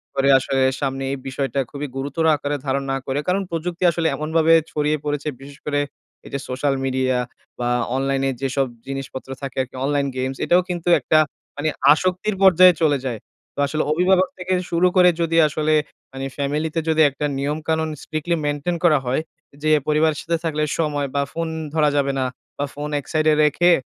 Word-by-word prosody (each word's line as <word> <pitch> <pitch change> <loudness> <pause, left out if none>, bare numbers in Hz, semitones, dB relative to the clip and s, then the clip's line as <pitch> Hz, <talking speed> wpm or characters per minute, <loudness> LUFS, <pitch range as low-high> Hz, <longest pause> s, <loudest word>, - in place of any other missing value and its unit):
পরে 135 0 +2
আসলে 135 0 -1 0.2
সামনে 135 -1 -2
এই 140 - -2
বিষয়টা 135 +1 -2
খুবই 145 0 -5
গুরুতর 140 +4 -2
আকারে 145 0 -2
ধারণ 135 0 0
না 135 - 0
করে। 135 +2 -1
কারণ, 185 +2 +2
প্রযুক্তি 170 +2 -3
আসলে 165 0 0
এমনভাবে 160 +1 +2 0.2
ছড়িয়ে 150 0 0
পড়েছে 145 0 -2
বিশেষ 140 +1 -12
করে, 145 -1 0 0.5
এই - - -10
যে 140 - -1
সোশ্যাল 135 +2 0
মিডিয়া 130 -1 0 0.4
বা 120 0 0 0.3
অনলাইনে 135 0 0
যেসব 135 0 0 0.2
জিনিসপত্র 135 -1 -6
থাকে 135 -2 -6
আরকি, 130 0 -7
অনলাইন 140 0 +1
গেমস, 130 +1 -2
এটাও 175 +1 +4
কিন্তু 175 -1 -4
একটা 155 - +2 0.4
মানে 150 +2 0 0.2
আসক্তির 185 +6 +1
পর্যায়ে 185 -1 +8
চলে 150 -3 +3
যায়। 120 -4 -3 0.4
তো - - -7
আসলে 155 +2 -1
অভিভাবক 185 +3 +3
থেকে 185 0 -2 0.2
শুরু 175 +2 +3
করে 180 -1 +7
যদি 165 0 +1
আসলে 155 +1 0 0.4
মানে 135 0 -5
ফ্যামিলিতে 150 +3 -1
যদি 160 0 +3
একটা 140 +2 -4
নিয়মকানুন 155 +3 -1
strictly 155 +2 -2
maintain 145 +4 -1
করা 155 -4 +5
হয়, 130 +5 0 0.4
যে 155 - +2 0.2
পরিবারের 155 0 +2
সাথে 170 0 -1
থাকলে 155 -1 0 0.2
সময় 145 -3 0
বা 140 - +2
ফোন 165 0 -2 0.3
ধরা 155 -2 +3
যাবে 140 -1 +2
না 130 - +1 0.3
বা 145 - -1
ফোন 145 +1 -5
এক 140 - -11
সাইডে 155 0 +3
রেখে 175 +4 +4
150 Hz, 180 wpm, -21 LUFS, 135-160 Hz, 0.5 s, পর্যায়ে